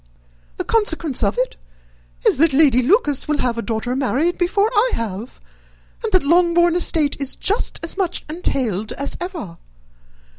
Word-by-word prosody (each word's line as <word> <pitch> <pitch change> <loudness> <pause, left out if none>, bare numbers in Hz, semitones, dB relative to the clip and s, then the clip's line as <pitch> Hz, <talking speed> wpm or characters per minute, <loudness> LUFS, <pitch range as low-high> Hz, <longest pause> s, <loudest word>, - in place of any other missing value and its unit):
The - - -2
consequence 330 - 0
of 200 0 0
it 255 +1 -1 0.7
is, - - +4
that 315 +1 +3
Lady 270 -4 +4
Lucas 295 - +2
will 300 -1 0
have 240 -4 -1
a - - 0
daughter 230 +2 -3
married 280 +6 0
before 400 +5 +1
I 470 +3 +3
have, 225 +1 -6 0.6
and 445 - -2
that 370 -4 +3
Longbourn 345 +2 +3
estate 320 -4 +1
is 275 -2 -2
just 415 +5 0
as 330 - -3
much 365 -3 -2
entailed 250 - -2
as 280 +1 -4
ever. 330 - -6
300 Hz, 155 wpm, -20 LUFS, 250-355 Hz, 0.7 s, is